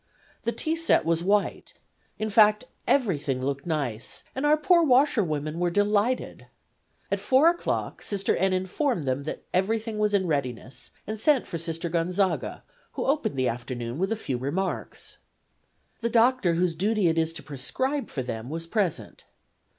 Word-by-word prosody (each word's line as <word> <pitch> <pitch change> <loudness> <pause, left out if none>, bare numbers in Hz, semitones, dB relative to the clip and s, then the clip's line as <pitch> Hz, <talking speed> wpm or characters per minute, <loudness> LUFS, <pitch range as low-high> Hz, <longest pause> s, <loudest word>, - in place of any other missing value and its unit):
The 235 - +2
tea 320 +6 -1
set 330 - +3
was 165 0 +1
white 205 +2 0 0.4
in 215 0 -2
fine, 210 0 +6 0.3
everything 155 - +1
looked 140 +3 -3
nice, 135 -9 -2
and 270 +3 0
our 305 +1 +5
poor 345 +2 +4
washwomen 185 - +2
were 175 0 +2
delighted. 205 +6 0 0.6
At - - +1
4 270 +5 +5
o'clock 345 0 -2
Sister 200 -1 0
N. 190 +1 +2
informed 185 - 0
them 135 +1 -2
that - - -5
everything 220 +3 0
was 210 -1 +2
in 190 -2 +2
readiness, 135 -5 -3 0.2
and 215 +1 -4
sent 275 +2 +3
for 170 - -5
Sister 165 +1 -3
Gonzaga, 180 +3 -1 0.3
who - - -3
opened 270 - 0
the 130 -1 +2
afternoon 120 +2 -4
with 190 +3 0
a - - +2
few 135 - -3
remarks. 170 +9 -4 0.8
The 235 - -1
doctor, 235 -6 +3
whose 175 0 +1
duty 205 +4 +1
it 165 0 +2
is 160 0 +1
to - - -7
prescribe 260 - -2
for 130 - -3
them, 115 0 -5
was 165 +2 -4
present. 190 -2 -2
185 Hz, 160 wpm, -26 LUFS, 155-225 Hz, 0.8 s, fine